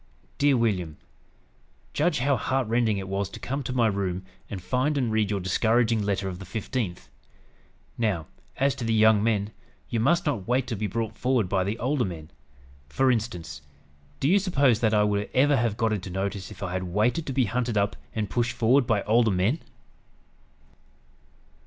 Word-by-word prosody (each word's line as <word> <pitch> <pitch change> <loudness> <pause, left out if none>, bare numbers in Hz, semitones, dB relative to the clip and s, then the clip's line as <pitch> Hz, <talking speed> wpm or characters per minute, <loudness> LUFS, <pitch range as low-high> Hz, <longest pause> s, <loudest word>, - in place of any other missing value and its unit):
"DEAR 140 -2 +4
WILLIAM: 90 -9 0 1.0
"Judge 155 +1 +1
how 140 +2 +3
heart 130 +1 -1
rending 115 -2 +1
it 95 -1 -5
was 100 -1 -2
to - - -9
come 135 +3 -3
to 130 - -5
my 125 -2 +2
room 95 -3 -1 0.2
and 100 - -5
find 130 +10 0
and 125 -5 0
read 110 -2 +1
your 100 -2 -1
discouraging 110 +4 +2
letter 100 -1 -1
of 90 -1 -5
the - - -8
15th. 105 -2 -4 0.9
Now, 100 -9 0 0.3
as 135 0 +2
to 130 - -6
the 115 0 +1
young 110 -1 +5
men, 105 -2 0 0.4
you 115 - -1
must 170 - +2
not 120 -11 -2
wait 125 +1 +1
to 125 - -3
be 105 +1 -2
brought 110 +2 -3
forward 125 -6 +1
by 95 0 +1
the 100 +4 -2
older 130 +2 0
men. 80 -5 -6 0.6
For 130 - +2
instance, 90 - -3 0.6
do - - +1
you 195 +6 +5
suppose 140 - +2
that 110 -2 +2
I 105 - +4
would 105 0 0
ever 140 +3 +4
have 115 -4 0
got 115 -2 +1
into 95 -2 -4
notice 95 +1 -3
if 105 -2 -9
I 90 - -3
had 95 0 -2
waited 110 - 0
to 135 - -2
be 130 -1 +2
hunted 120 +1 -1
up 100 0 +1 0.2
and 110 -2 -1
pushed 120 +2 -1
forward 120 +2 +3
by 105 -3 +1
older 115 +1 +3
men?" 100 - +1
110 Hz, 190 wpm, -26 LUFS, 100-125 Hz, 1.0 s, young